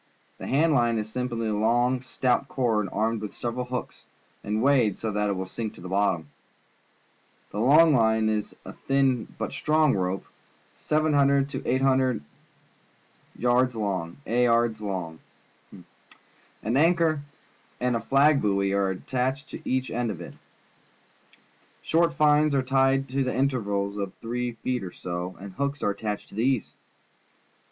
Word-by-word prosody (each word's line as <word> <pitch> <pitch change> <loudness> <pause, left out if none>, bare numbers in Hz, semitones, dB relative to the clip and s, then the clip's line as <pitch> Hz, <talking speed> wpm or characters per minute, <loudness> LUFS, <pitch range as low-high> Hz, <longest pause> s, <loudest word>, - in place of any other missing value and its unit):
The - - -6
hand 155 +4 +3
line 120 -4 +2
is 110 0 -4
simply 120 -1 -2
a 110 - 0
long, 120 +4 +2
stout 130 +1 0
cord, 115 -7 0
armed 110 +1 0
with 105 - -6
several 120 +1 -3
hooks, 125 0 -6 0.4
and 105 +1 -1
weighted 130 -8 +3
so 110 - -3
that 105 0 0
it - - +1
will 95 0 -3
sink 110 +3 -5
to - - -13
the 90 - -7
bottom. 90 -6 0 1.2
The 105 - -4
long 150 +7 +6
line 110 -3 +3
is 110 -1 -2
a - - -8
thin 135 -3 +1
but - - -4
strong 155 -2 +2
rope, 95 0 -2 0.5
700 140 -3 +2
to - - -5
800 130 - +2 1.2
A - - -1
ards 125 0 +3
long. 95 -6 -3 1.5
An 115 +5 -8
anchor 165 -1 +3 0.6
and 125 -1 0
a 115 - -1
flag 140 +4 +4
buoy 100 -1 +1
are 100 -1 +1
attached 130 +8 -2
to - - -7
each 130 0 -1
end 120 0 -1
of 95 -5 -5
it. 85 - -9 1.5
Short 165 +1 +2
fines 150 -1 +3
are 135 - +2
tied 135 +1 +2
to 135 +2 -2
it 130 - 0
at - - -1
intervals 105 -7 -1
of 100 -2 -4
three 120 +1 -3
feet 125 -3 -1
or 90 - -6
so, 90 +1 -5
and 100 0 -9
hooks 140 +3 -3
are 100 - +2
attached 105 0 -5
to - - -13
these. 125 +1 0
120 Hz, 150 wpm, -26 LUFS, 105-135 Hz, 1.5 s, long